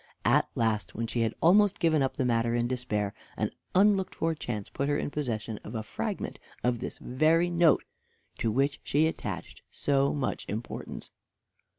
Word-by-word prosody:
At - - +4
last, 110 -2 0
when 115 - -1
she 115 +1 -1
had 115 -1 0
almost 200 +4 +5
given 160 -3 +3
up 135 - 0
the 130 - +1
matter 115 -1 +2
in 120 0 +1
despair, 110 -5 -1 0.2
an - - 0 0.2
unlooked 195 0 +4
for 165 0 0
chance 110 -9 -4
put 140 +1 -2
her 145 - +2
in - - -2
possession 115 -7 -3
of 110 - -7
a 110 - -2
fragment 110 - -4 0.2
of 125 -1 +1
this 125 - -5
very 160 +7 +2
note 170 -1 +4 0.6
to 115 - +1
which 135 +5 +1
she 150 +3 +2
attached 100 - -4
so 140 -1 +2
much 140 -2 -2
importance. 110 +3 -6
125 Hz, 175 wpm, -29 LUFS, 115-155 Hz, 0.6 s, almost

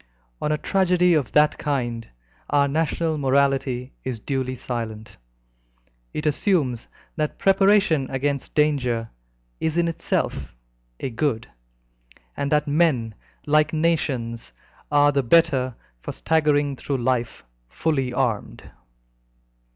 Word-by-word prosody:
On 150 - 0
a 150 - +1
tragedy 180 0 +2
of 150 -6 0
that 150 0 +4
kind 120 -6 -2 0.4
our 140 -1 +3
national 160 +1 -1
morality 135 -2 +1
is 125 -3 -4
duly 130 +1 -2
silent. 115 -3 -6 0.9
It 150 - -4
assumes 150 - +1 0.3
that 155 -1 -2
preparation 195 -7 +3
against 140 +1 -2
danger 125 -7 +1 0.5
is 160 +1 -1
in 170 0 +2
itself 165 - -2 0.4
a 130 - -3
good, 115 -2 -1 0.9
and 140 - -2
that 150 -1 +2
men, 145 -7 +2 0.3
like 150 +1 +3
nations, 135 - -1 0.4
are 145 0 +5
the 140 -1 +1
better 130 -3 +3 0.2
for - - -6
staggering 145 -3 +1
through 140 +1 -2
life 120 - -1 0.2
fully 135 - -1
armed. 120 -4 -2
140 Hz, 110 wpm, -23 LUFS, 125-155 Hz, 0.9 s, are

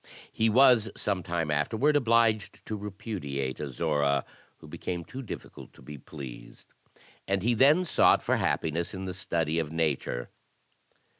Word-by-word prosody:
He 110 0 +1
was 120 -2 +5
sometime 85 -5 -2
afterward 110 - +1
obliged 115 -5 +2
to 110 - -4
repudiate 95 - -5
Azora, 70 -1 0 0.3
who - - -14
became 85 -2 -5
too 130 - -7
difficult 120 - -9
to - - -17
be 75 -1 -9
pleased; 70 -3 -11 0.5
and 95 -1 0
he 120 +2 +3
then 145 +10 +5
sought - - +4
for - - +1
happiness 85 +4 -1
in 95 0 -5
the 90 - -4
study 85 -4 -1
of 80 -2 -3
nature. 75 -6 -2
90 Hz, 140 wpm, -28 LUFS, 75-110 Hz, 0.5 s, was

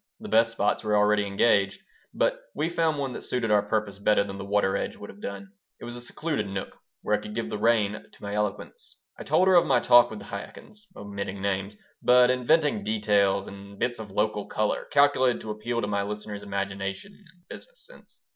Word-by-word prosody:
The - - -8
best 115 +1 +4
spots 105 -2 0
were 105 -1 +1
already 105 0 +3
engaged, 100 -1 +2 0.3
but - - 0
we 155 +3 0
found 165 -3 0
one 135 -3 -3
that - - -6
suited 120 -3 -2
our 105 -1 +5
purpose 105 -1 -2
better 105 0 +3
than 100 -1 -7
the - - -5
water 100 -1 +1
edge - - -3
would - - -10
have 100 - -18
done. 100 -1 -7 0.3
It - - -9
was 120 - -7
a 120 - -7
secluded 140 -2 -3
nook 95 -1 -5 0.3
where 105 - +2
I - - -3
could 105 0 -8
give 115 0 -3
the 105 - -3
rein 105 -2 +1
to - - -19
my 100 0 -4
eloquence 105 - -4 0.2
I - - -6
told 175 +5 +3
her 190 - +5
of 175 - +5
my 130 -2 +4
talk 120 0 +6
with 110 - -7
the 100 - -10
Chaikins, 210 - -10
omitting 100 -1 -6
names, 100 +1 -2 0.2
but 125 0 +5
inventing 130 -2 +2
details 100 -2 +1
and 100 0 -11
bits 120 +2 -1
of 110 -2 -7
"local 105 +1 -1
color" 105 0 -1
calculated 140 -3 +3
to 110 - -5
appeal 115 +3 -3
to - - -1
my 100 -1 0
listener's 105 0 -5
imagination 100 - -4
and 180 -3 -23
business - - -11
sense. - - -19
105 Hz, 215 wpm, -26 LUFS, 100-125 Hz, 0.3 s, talk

